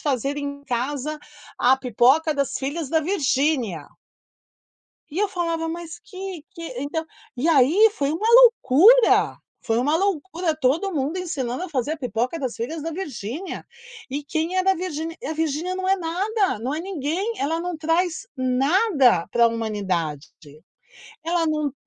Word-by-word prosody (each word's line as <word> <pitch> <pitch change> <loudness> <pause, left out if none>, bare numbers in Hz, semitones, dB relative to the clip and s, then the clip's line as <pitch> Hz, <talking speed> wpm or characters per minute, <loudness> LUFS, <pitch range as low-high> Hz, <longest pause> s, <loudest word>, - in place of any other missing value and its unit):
fazer 275 0 -1
em 280 0 -5
casa 280 +5 -3 0.4
a 255 +2 +4
pipoca 265 +5 +3
das 280 -2 -1
filhas 285 +3 -3
da 320 - +3
Virginia". 275 - 0 1.2
E 320 - -5
eu 415 -1 +2
falava: 335 -3 -2
"Mas 335 0 -6
que 375 -6 -8
que" 335 - -11 0.2
então 320 +3 -3 0.3
e 280 +7 0
aí 330 - +5
foi 280 -9 -1
uma 420 +7 -2
loucura. 465 - +6 0.2
Foi 225 -1 0
uma 290 +5 +2
loucura, 355 -2 -1
todo 310 +7 0
mundo 295 +5 -1
ensinando 285 -4 -3
a 370 - -7
fazer 280 0 -1
a - - -3
pipoca 250 - -2
das 260 -5 -3
filhas 300 +7 -5
da 325 +1 -4
Virginia. 310 - -6 0.4
E 280 +2 -4
quem 320 +5 -2
era 375 +1 +3
a - - -2
Virginia? 330 -2 -4
E - - -7
a 310 - -2
Virginia 320 +3 -2
não 375 0 -3
é 390 - +4
nada, 380 - -1
não 250 +4 -2
é 320 - -3
ninguém, 370 - -2
ela 320 +4 -1
não 355 0 -4
traz 325 +2 -1
nada 265 - +3
para 235 -1 +4
humanidade. 190 -10 -3 1.0
Ela 335 0 +1
não 305 -2 -1
310 Hz, 155 wpm, -23 LUFS, 265-355 Hz, 1.2 s, loucura